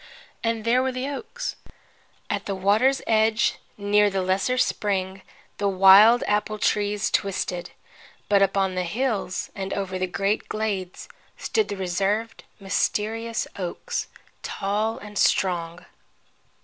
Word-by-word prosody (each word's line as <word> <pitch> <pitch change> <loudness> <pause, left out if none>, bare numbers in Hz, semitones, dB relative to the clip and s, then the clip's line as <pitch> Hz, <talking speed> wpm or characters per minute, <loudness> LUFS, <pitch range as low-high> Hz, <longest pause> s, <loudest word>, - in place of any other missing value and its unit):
And 230 -1 -1
there 245 +2 +3
were 260 0 0
the 255 +1 -3
oaks. 440 - -5 0.7
At - - -3
the 195 - -2
water's 215 +8 +2
edge, 220 0 +2 0.2
near 205 0 +3
the 195 -1 -1
lesser 190 +7 0
spring, 195 -5 -1 0.4
the 200 - +1
wild 195 +5 +7
apple 210 +1 0
trees 210 0 0
twisted, 185 -3 -1 0.6
but 200 -1 +4
upon 195 -1 +2
the 185 - -1
hills 205 0 -2
and 195 -1 -5
over 190 -2 -3
the 185 - 0
great 195 +3 -1
glades 200 -4 -3 0.3
stood 435 - 0
the 200 - -5
reserved, 200 +5 -1 0.2
mysterious 220 +3 -1
oaks, 195 - -4 0.3
tall 210 +3 -2
and 210 -1 -7
strong. 175 -2 +1
205 Hz, 125 wpm, -24 LUFS, 190-225 Hz, 0.7 s, wild